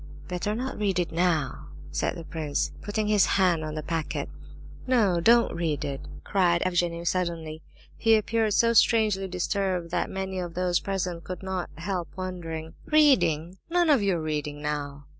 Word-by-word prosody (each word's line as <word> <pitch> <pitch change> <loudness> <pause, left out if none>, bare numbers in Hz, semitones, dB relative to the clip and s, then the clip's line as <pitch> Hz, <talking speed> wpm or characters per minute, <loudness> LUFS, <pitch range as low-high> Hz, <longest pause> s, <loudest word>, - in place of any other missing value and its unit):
"Better 180 +4 -2
not 255 +1 -4
read 200 -3 +1
it 175 -2 0
now," 160 - 0 0.2
said 75 - -1
the 170 - -7
prince, 155 -3 -2
putting 210 +1 -2
his 210 -2 +4
hand 180 -4 +3
on 155 0 -4
the 155 - -4
packet. 165 0 -3 0.6
"No, 215 -9 +3
don't 235 +5 +5
read 160 -4 -1
it!" 135 -1 -4 0.2
cried 175 -3 +2
Evgenie 175 -2 0
suddenly. 165 -3 -2 0.4
He 225 0 +4
appeared 220 0 +1
so 230 0 +4
strangely 215 -4 +3
disturbed 180 -1 -1
that - - 0
many 190 -1 -3
of 175 -2 -5
those 180 -1 +1
present 180 -3 -3
could 185 0 -7
not 190 -2 -3
help 175 0 -3
wondering. 165 -4 -5
"Reading? 190 - +3
None 345 -2 +3
of 275 -6 +4
your 195 -4 +1
reading 150 -2 -3
now!" 145 -1 -4
180 Hz, 160 wpm, -27 LUFS, 165-200 Hz, 0.6 s, don't